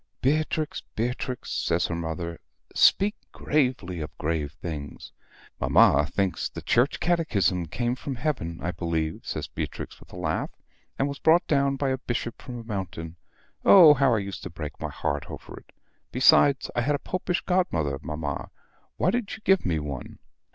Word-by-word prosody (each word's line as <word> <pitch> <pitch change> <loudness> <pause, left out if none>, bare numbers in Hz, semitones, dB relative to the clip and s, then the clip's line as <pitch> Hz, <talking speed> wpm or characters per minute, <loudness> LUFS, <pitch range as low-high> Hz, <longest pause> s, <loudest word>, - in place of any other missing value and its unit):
"Beatrix. 155 +2 0
Beatrix!" 125 +2 -3
says 85 +1 +1
her - - -2
mother, 85 0 -4 0.3
"speak 205 +2 +5 0.2
gravely 125 - 0
of 75 - -7
grave 75 -2 -1
things." 80 -5 -7 0.5
"Mamma 75 +1 +5
thinks 95 0 -1
the - - -8
Church 125 +4 +2
Catechism 100 - +1
came 120 +9 -1
from 135 +1 -5
heaven, 120 - -2
I 90 - 0
believe," 80 -3 -2
says - - -4
Beatrix, - - -6
with - - -17
a - - -10
laugh, - - -1 0.5
"and 135 - +1
was 140 0 -5
brought 165 +2 +4
down 140 -2 +2
by 135 0 -1
a 130 0 -1
bishop 120 -2 -4
from 125 -3 -7
a 115 - -7
mountain. 90 -6 -5 0.5
Oh, 170 -6 +9
how 135 -4 +3
I 100 -3 -1
used 100 - -6
to - - -6
break 80 -3 -7
my - - -2
heart 70 0 -3
over - - -9
it! - - -24 0.4
Besides, 135 +2 +5
I 120 - +2
had 145 +5 +1
a - - 0
Popish 180 +2 -2
godmother, 80 - 0
mamma; 75 -3 -4 0.5
why - - +2
did 240 -3 -2
you - - -14
give 190 - +4
me 85 -3 +1
one?" 70 -4 -6
115 Hz, 170 wpm, -26 LUFS, -, 0.5 s, Oh